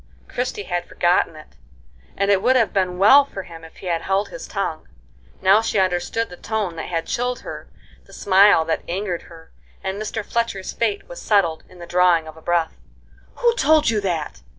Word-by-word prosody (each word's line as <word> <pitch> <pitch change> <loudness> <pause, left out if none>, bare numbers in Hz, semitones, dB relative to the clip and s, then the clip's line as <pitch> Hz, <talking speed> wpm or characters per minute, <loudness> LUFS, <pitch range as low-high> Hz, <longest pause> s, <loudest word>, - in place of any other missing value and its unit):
Christie 245 -4 -3
had 175 -2 -3
forgotten 175 -2 +1
it, 155 - -15 0.6
and 200 +1 +2
it 195 -1 +3
would 250 +4 +3
have 230 -4 +2
been 185 -2 0
well 240 +10 +7
for 200 -8 -8
him 165 -2 -12
if 160 - -13
he - - -12
had 170 -2 -1
held 195 +1 0
his - - -8
tongue. - - -4 0.6
Now 195 +3 +6
she 225 -1 -1
understood 190 +4 0
the 180 - -10
tone 210 -5 -3
that 160 - -5
had 165 -2 -2
chilled 245 +1 -2
her, - - -9 0.4
the - - -19
smile 195 -4 +4
that 160 - -1
angered 180 0 -3
her, 165 -1 -15 0.3
and 190 +2 -3
Mr. 215 0 -4
Fletcher's 230 -5 -2
fate 220 -3 -1
was - - -9
settled 185 -7 +1
in 185 - -16
the 175 - -9
drawing 175 -2 +3
of 155 - -10
a 160 - -15
breath. 170 -1 0 0.6
"Who 475 -1 +2
told 310 - +4
you 215 -2 0
that?" 170 - -3
190 Hz, 195 wpm, -21 LUFS, 175-220 Hz, 0.6 s, well